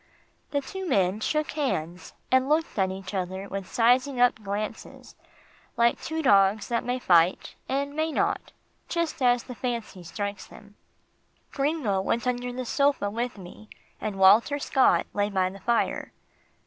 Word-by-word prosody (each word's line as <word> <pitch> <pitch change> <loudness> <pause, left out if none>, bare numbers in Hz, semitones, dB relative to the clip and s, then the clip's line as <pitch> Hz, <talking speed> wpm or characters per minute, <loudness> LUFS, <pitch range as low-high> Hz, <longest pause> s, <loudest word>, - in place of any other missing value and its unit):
The 285 - -1
two 380 +5 -6
men 195 -4 +2
shook 305 +7 -1
hands, 180 - -3 0.2
and 260 +1 +3
looked 315 +2 +1
at 190 -1 +2
each 190 +1 -7
other 190 +1 -3
with 195 -2 -6
sizing 250 +3 +2
up 245 -3 +3
glances, 210 +2 -6 0.6
like 235 0 +2
two 320 0 -3
dogs 200 -2 +4
that 235 -1 0
may 250 +1 -1
fight 175 -6 +3 0.2
and 280 +1 -1
may 315 +1 -1
not, - - -1 0.4
just 335 -3 -2
as 245 -1 +3
the 250 - -8
fancy 235 -6 -4
strikes 200 +3 -5
them. 205 0 -15 0.8
Gringo 275 -9 0
went 230 +5 -1
under 245 0 -1
the 255 +1 -5
sofa 280 -6 +1
with 240 +2 -3
me, 195 +3 -12 0.3
and 210 - -3
Walter 210 +9 +5
Scott 270 -2 +3
lay 205 0 0
by 185 -2 0
the 195 - -11
fire. 235 +3 -1
235 Hz, 155 wpm, -26 LUFS, 195-270 Hz, 0.8 s, Walter